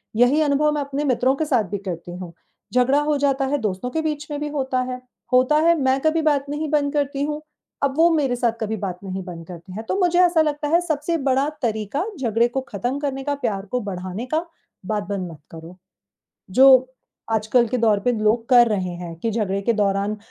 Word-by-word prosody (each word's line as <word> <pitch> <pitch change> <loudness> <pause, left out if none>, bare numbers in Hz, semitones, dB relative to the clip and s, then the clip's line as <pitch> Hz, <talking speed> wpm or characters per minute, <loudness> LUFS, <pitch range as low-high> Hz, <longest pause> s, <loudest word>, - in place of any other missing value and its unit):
यही 245 +7 +4
अनुभव 300 0 +2
मैं 295 - -1
अपने 280 +1 -3
मित्रों 260 +1 +2
के 315 - -1
साथ 250 -7 +2
भी 205 - -1
करती 175 0 -6
हूँ, 175 -2 -8 0.4
झगड़ा 255 +3 +3
हो 295 0 +1
जाता 275 -1 +1
है 290 +2 0
दोस्तों 205 +3 -2
के 320 - -1
बीच 300 -1 -3
में 290 - -3
भी 295 - -3
होता 265 -3 -1
है। 250 0 -6 0.3
होता 255 +4 +4
है 335 - +6
मैं 265 +1 +2
कभी 315 +2 +2
बात 290 -3 +2
नहीं 300 +1 -3
बंद 290 -1 +1
करती 285 -1 -1
हूँ, 300 +1 -3 0.4
अब 275 -1 +2
वो 335 +1 +6
मेरे 270 -5 +1
साथ 240 -1 +1
कभी 220 0 -1
बात 185 -3 -4
नहीं 190 0 -4
बंद 170 -2 -8
करते 180 +1 -10
हैं, 220 +3 -6
तो 225 - -2
मुझे 355 -1 +3
ऐसा 345 -2 +4
लगता 295 -1 -1
है 335 - +4
सबसे 320 -1 -1
बड़ा 270 +2 +2
तरीका 220 - -1 0.2
झगड़े 235 -1 +2 0.2
ख़त्म 245 +7 -2
करने 270 -2 -3
का 290 0 -1
प्यार 215 -8 -3
को 250 - 0
बढ़ाने 185 +2 -5
का, 325 +2 +1 0.4
बात 210 0 -1
बंद 185 -4 -3
मत 155 - -12
करो। 165 +2 -11 0.7
जो 260 +8 +6 0.7
आजकल 220 +3 +2
के 255 - -1
दौर 220 -3 +3
पे 245 +4 +1
लोग 220 +2 +1
कर 240 -2 +6
रहे 190 -4 -1
हैं 175 -1 -7
कि 230 - -1
झगड़े 200 -3 -1
के 235 - +2
दौरान 200 -1 0
अ, - - -10
250 Hz, 220 wpm, -22 LUFS, 205-290 Hz, 0.7 s, है